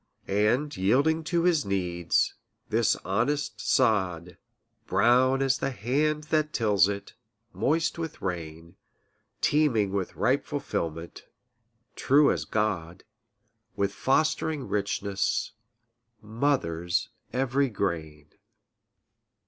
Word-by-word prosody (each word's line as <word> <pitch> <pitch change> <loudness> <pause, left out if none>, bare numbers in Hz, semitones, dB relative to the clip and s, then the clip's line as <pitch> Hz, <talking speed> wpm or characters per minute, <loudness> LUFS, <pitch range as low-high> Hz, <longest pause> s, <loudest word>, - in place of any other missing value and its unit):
And 110 +9 +1
yielding 140 +12 +2
to 170 0 0
his 170 -5 +3
needs, 90 -4 0 0.4
this - - +2
honest 110 +2 -1
sod, 90 -5 +1 0.5
Brown 125 +7 +3
as 135 0 +1
the 135 - -1
hand 145 +6 0
that 155 -1 +1
tills 105 -5 +3
it, 100 0 -5 0.4
moist 165 +3 0
with 165 -2 -5
rain, 85 -2 -6 0.6
Teeming 125 -10 +2
with 95 -2 -3
ripe - - +1
fulfilment, 80 +1 -5 0.7
true 140 +2 +4
as - - -2
God, 95 -5 -2 0.7
With 100 0 -1
fostering 155 +4 0
richness, 100 -1 -1 0.7
mothers 105 - -1 0.2
every 135 +1 +1
grain. 80 -8 -4
110 Hz, 95 wpm, -27 LUFS, 95-140 Hz, 0.7 s, true